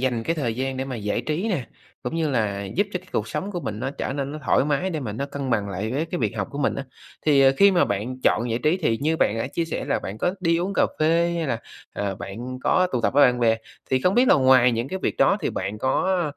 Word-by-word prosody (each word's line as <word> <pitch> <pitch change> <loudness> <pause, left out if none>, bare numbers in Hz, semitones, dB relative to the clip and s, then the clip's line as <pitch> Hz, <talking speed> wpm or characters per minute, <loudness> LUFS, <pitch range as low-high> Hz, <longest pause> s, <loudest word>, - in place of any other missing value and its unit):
dành 125 -3 0
cái 165 - -1
thời 120 -7 -1
gian 130 0 -2
để 130 - -2
mà 130 -3 -5
giải 105 -1 -2
trí 170 +9 -2
nè, 155 - -1 0.4
cũng - - -4
như 160 -3 0
là 100 -5 -1
giúp 190 - 0
cho 180 - -1
cái 185 +1 -19
cuộc - - -1
sống 195 - -3
của 175 - -3
mình 105 -7 -4
nó 130 - -2
trở 135 - -4
nên 140 0 -3
nó 155 - -5
thoải - - +3
mái 150 +6 0
để 160 -4 -3
mà 110 -6 -4
nó 140 +6 -3
cân 140 -2 -4
bằng 105 -4 0
lại 100 +3 -3
với 145 +5 0
cái 175 - -4
việc 110 -2 -1
học 95 - -2
của 140 - -6
mình 140 - +1
á, 140 - -4 0.4
thì, 145 -3 +5
ờ, 135 0 +6
khi 200 0 +7
mà 180 - +3
bạn 115 +6 -3
chọn 120 +2 +2
giải 115 - 0
trí, 155 +6 +2
thì 130 -11 0
như 155 +3 +1
bạn 115 -7 +1
đã 115 - -1
chia 165 +5 -2
sẻ 165 - -4
là - - 0
bạn 100 +3 -7
có 180 - 0
đi 170 -2 +2
uống 190 +3 -2
cà - - +4
phê 165 +2 +2
hay 165 - -1
là, 120 -4 -1 0.3
à, 100 -1 -2
bạn 120 +8 -7
có 185 0 +3
tụ 125 - +1
tập 115 - +1
với 145 - +7
bạn 125 -1 0
bè, 115 -1 +4 0.3
thì 130 - +2
không 180 +7 +2
biết 245 +1 +4
là - - +7
ngoài 130 -2 +5
những 115 +3 -2
cái 190 - -3
việc - - -1
đó 200 - +4
thì - - -1
bạn 100 +3 -4
có, 175 - +1
135 Hz, 295 wpm, -24 LUFS, 115-165 Hz, 0.4 s, khi